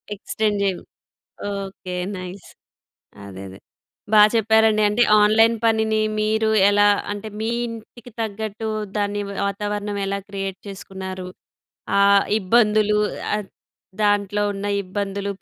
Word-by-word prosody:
Extend 210 +1 -2
చేయండి 190 -3 -1 0.7
okay. 195 -2 -6 0.2
Nice. 185 +1 -8 0.8
అదే 95 -1 -9
అదే 95 - -12 0.5
బా 210 - +7
చెప్పారండి. 220 -1 +3
అంటే 220 +4 +2 0.2
ఆన్లైన్ 225 +2 +4
పనిని 220 -1 +2 0.2
మీరు 220 +1 +1 0.2
ఎలా 205 0 +4 0.3
అంటే 205 +1 -6
మీ 220 - -1 0.2
ఇంటికి 230 +1 -10
తగ్గట్టు 220 0 -4 0.3
దాన్ని 205 0 -1 0.3
వాతావరణం 205 +1 -3
ఎలా 200 0 -2
క్రియేట్ 195 -1 -5
చేసుకున్నారు. 190 -1 -7 0.7
ఆ - - +5 0.4
ఇబ్బందులు 210 0 +3 0.4
ఆ! - - +2 0.7
దాంట్లో 205 0 +1
ఉన్న 200 +1 -5 0.2
ఇబ్బందులు 200 +1 -4
205 Hz, 110 wpm, -22 LUFS, 195-220 Hz, 0.8 s, బా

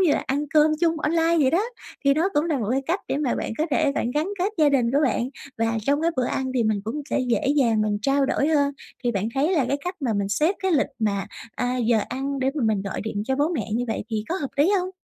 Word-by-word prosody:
như 355 -5 +4
là - - 0
ăn 285 +3 0
cơm 305 0 +6
chung 330 -2 +2
online 330 +2 +2
vậy 270 -4 +4
đó. 335 - +2 0.5
Thì 275 - +5
nó 330 +6 +2
cũng 295 +2 +3
là 310 -5 0
một 215 - -2
cái 270 +1 +1
cách 355 +4 0
để - - 0
mà 285 -4 0
bạn - - -3
có 315 - +1
thể 280 +1 +2
bạn 240 - -1
gắn 300 +7 0
kết 385 +4 0
gia 300 -2 +5
đình 250 -4 +2
của 280 - +3
bạn 250 -1 0 0.3
và 225 0 +1
trong 285 +5 +1
cái 335 - +3
bữa 255 - +1
ăn 260 +1 -2
thì 240 - +2
mình 215 -2 +1
cũng 270 +7 -3
sẽ - - +1
dễ 250 +1 0
dàng 230 -6 +3
mình 205 -1 0
trao 275 +1 +2
đổi 280 - +1
hơn. 285 -2 +2 0.3
Thì 240 - +2
bạn 200 +2 -1
thấy 295 +7 +2
là 290 - +2
cái 280 - +1
cách 360 +1 -2
mà 250 -5 0
mình 200 -1 -1
xếp 310 - +2
cái 380 - +1
lịch 285 - +3
mà, 200 -3 0 0.3
a, 250 0 -1
giờ 235 -2 +2
ăn 275 +1 -3
để 265 0 +1
mà 290 - -2
mình 215 -3 +1
gọi 195 - -4
điện 210 -2 -3
cho 265 0 0
bố 295 +3 +2
mẹ 220 -6 -3
như 245 +1 0
vậy 225 - -2
thì 215 -1 -2
có 345 - -1
hợp 280 - -2
lý 300 +7 +4
hông? 365 +1 -3
275 Hz, 285 wpm, -24 LUFS, 230-305 Hz, 0.5 s, cơm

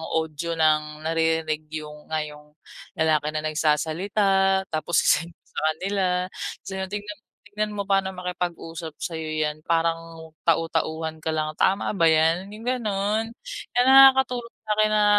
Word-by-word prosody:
audio 160 +1 -2
ng 155 -1 +1
naririnig 160 -1 0
yung 150 -1 -7
nga 155 -1 +1
yong 150 0 -12 0.4
lalaki 155 -2 +2
na 155 - -1
nagsasalita, 190 +6 +2
tapos 160 +2 +1
ise-send 170 +2 +2
ko - - -65
sa - - -4
kanila, 195 +4 -1 0.2
tapos 195 - -7
yun, 190 0 -3
"Tingnan 205 0 -5
mo - - -50 0.2
tingnan 210 0 -2
mo 200 - -2
paano 195 -1 +3
makipag-usap 170 -3 -5
sa'yo 160 -1 -5 0.2
yan 150 0 -3
parang 165 -1 -1 0.2
tau-tauhan 160 -1 0
ka 160 - -1
lang, 155 0 -1
tama 195 +1 +2
ba 170 - +4
yan?" 160 +3 +3
Yung 215 - -10
ganon. 220 -2 -1 0.4
Kaya 245 - +5
nakakatulong 265 -3 +6
sa'kin 215 0 +2
na 210 - +4
165 Hz, 145 wpm, -24 LUFS, 155-200 Hz, 0.4 s, nakakatulong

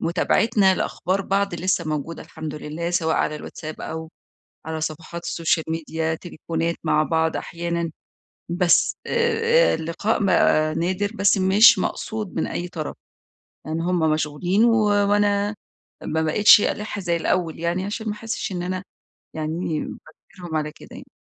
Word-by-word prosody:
مُتابعتنا 190 +3 +2
لأخبار 185 +3 -1
بعض 200 -1 0
لسّه 180 0 0
موجودة 155 +2 -4
الحمد 155 -2 -7
لله، 155 +3 -4
سواء 165 -2 +1
على 150 - 0
الواتساب 155 +1 -8
أو 160 0 -5 0.6
على 160 0 -3
صفحات 165 +2 -5
السوشيال 165 -1 0
ميديا، 160 0 -2
تليفونات 165 0 -3
مع 155 -1 +3
بعض 160 0 0
أحيانًا. 170 0 -3 0.6
بس 175 0 +3
آآ 470 +1 +3
اللقاء 170 +7 -1
بقى 155 -4 +3
نادر، 185 +5 -1
بس 200 -2 +3
مش 195 +4 +7
مقصود 215 -4 -3
من 160 - -1
أي 175 - -4
طرف. 155 -3 -5 0.7
لإن 160 +2 -2
هم 175 +1 0
مشغولين، 160 +7 +1
و - - +5 0.4
وأنا 205 0 +2 0.5
ما 160 - -1
بقيتش 205 +7 +6
ألَِح 210 0 -2
زي 175 -2 0
الأول 165 -1 -1
يعني، 170 +3 -1
عشان 220 +2 -4
ما 210 - -1
أحسّش 220 0 -4
إن 180 -2 -3
أنا 185 +1 -3 0.5
يعني 155 +1 -3 0.2
باجبرهم 175 +1 -8
على 150 0 -2
كده - - -14
يعني. - - -10
170 Hz, 145 wpm, -23 LUFS, 160-200 Hz, 0.7 s, مش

